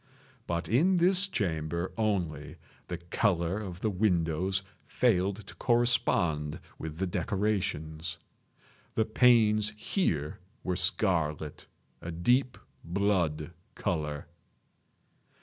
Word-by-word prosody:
But 85 0 -2
in 165 - +3
this 185 +3 +4
chamber 85 - -2
only, 90 -10 -1 0.3
the 90 - -4
color 85 +1 0
of 90 -4 -7
the 110 - +1
windows 90 -1 +1 0.2
failed 100 -3 +1
to - - -11
correspond 85 - +1 0.2
with 80 -1 -6
the 95 - 0
decorations. 90 -5 -2 0.8
The 110 - +2
panes 110 -2 +4
here 80 - -1 0.2
were 90 - -1
scarlet—a 85 -4 -1
deep 125 +9 +2 0.3
blood 85 -4 0 0.2
color. 75 -6 -2
95 Hz, 95 wpm, -30 LUFS, 80-110 Hz, 0.8 s, this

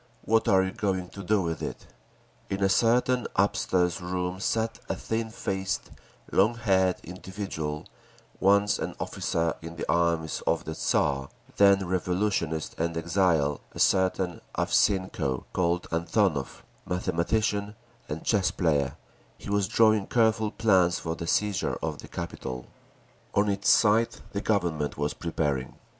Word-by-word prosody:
What 115 +2 +2
are 95 -3 +5
you 95 - -2
going 95 -3 -2
to 100 - -9
do 100 +1 +1
with 80 -1 -3
it?'" - - -5 0.6
In 95 0 -1
a 95 - +4
certain 120 +4 +3
upstairs 95 -2 +1
room 90 +1 -3
sat 110 +2 -1
a - - 0
thin 110 0 -3
faced, 95 -4 -3 0.4
long 105 +5 +3
haired 95 -5 +2
individual, 90 -4 -5 0.5
once 100 +1 +3
an - - -4
officer 80 -1 -1
in 80 +1 -8
the 80 - -5
armies 85 -2 +1
of - - +1
the - - -4
Tsar, 70 -2 0 0.3
then 100 -1 +5
revolutionist 90 -3 -1
and 85 0 -1
exile, 80 -4 +1
a - - -8
certain 95 -1 +2 0.2
Avseenko, 95 -9 +1
called 90 -1 0
Antonov, 85 - 0 0.2
mathematician 100 +4 -1 0.3
and 75 +2 -4
chess 100 -4 +2
player; 75 -6 0 0.4
he - - -7
was 100 -1 +2
drawing 110 -2 +3
careful 110 -2 +2
plans 95 -6 +3
for 80 -1 -3
the 85 0 -6
seizure 105 +2 0
of - - -3
the - - -10
capital. 65 -1 -6 0.7
On 100 +1 +3
its 100 -1 +1
side 110 +1 +4 0.2
the 100 - -3
Government 85 -9 0
was 75 0 -1
preparing. 75 -6 -2
95 Hz, 140 wpm, -27 LUFS, 85-105 Hz, 0.7 s, are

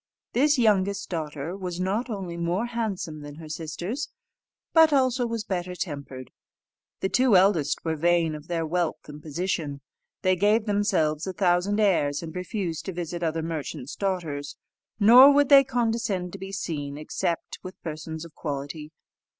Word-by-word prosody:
This 290 +4 +3
youngest 200 -4 +2
daughter 155 0 -4
was 180 -3 -5
not 205 +7 -1
only 190 -6 -4
more 170 +6 -1
handsome 210 -10 -3
than 145 0 -9
her 160 0 -10
sisters, 170 - -4 0.6
but 320 -1 +7
also 255 -3 +2
was 230 -2 -3
better 180 -3 -3
tempered. 140 -6 -6 0.7
The 190 - 0
two 250 -4 +4
eldest 180 -6 +2
were 160 -1 0
vain 170 0 +2
of 150 +1 -9
their 165 -2 -1
wealth 170 +1 -2
and 150 0 -10
position. 155 -2 -3 0.4
They 185 0 +4
gave 210 +4 +3
themselves 195 -7 +1
a 190 - -3
thousand 185 +3 +2
airs, 170 -8 +2
and 165 +1 -8
refused 180 -3 -3
to 190 - -4
visit 175 0 -4
other 165 -1 -1
merchants' 150 -4 -5
daughters; 160 -7 -3 0.4
nor 245 +7 +9
would 285 -1 +4
they 280 -1 +9
condescend 225 -8 -1
to 195 - -7
be 195 +1 -7
seen 145 -6 -4
except 165 +2 -3
with 185 0 -10
persons 160 0 -6
of 165 - -13
quality. 150 +1 -5
180 Hz, 160 wpm, -26 LUFS, 155-205 Hz, 0.7 s, nor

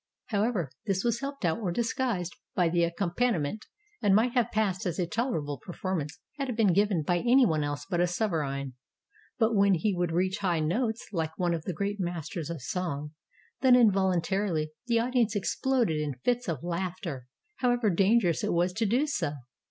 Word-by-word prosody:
However, 205 - 0 0.2
this 195 -1 0
was 235 -1 +1
helped 275 -5 -4
out 160 +3 +1
or 195 -6 -1
disguised 225 -4 -1 0.2
by 175 -2 +3
the 170 0 +2
accompaniment, 175 +1 -1 0.3
and 205 -3 +4
might 230 +4 +3
have 240 -2 +1
passed 200 -5 0
as 175 - -2
a 180 - +1
tolerable 170 - -2
performance 175 -3 -4 0.2
had 275 -1 -2
it 245 - -2
been 210 -6 +4
given 200 -4 +2
by 175 +3 +1
any 250 +5 +5
one 155 -7 +1
else 145 0 -3
but 175 -3 -1
a 175 - +3
sovereign. 150 - -2 0.6
But 225 -1 +2
when 200 -2 +4
he 190 +4 0
would 175 -1 0
reach 185 +4 0
high 180 -5 +1
notes 220 +9 -1
Hke 160 -3 0
one 175 -2 +1
of 160 -2 -4
the 185 - -2
great 200 +4 -2
masters 175 -1 -4
of 165 -7 -5
song, 150 -3 -3 0.5
then 260 -2 +7
involuntarily 190 -6 +2 0.2
the 235 -1 +3
audience 235 -2 +1
exploded 230 -2 +1
into 145 -4 -3
fits 245 -1 +1
of 160 -4 -3
laughter, 175 -6 -4 0.3
however 245 -4 +2
dangerous 190 -1 +3
it - - 0
was 175 +1 +1
to 220 +3 0
do 250 +8 +2
so. 175 - -1
185 Hz, 185 wpm, -28 LUFS, 170-225 Hz, 0.6 s, then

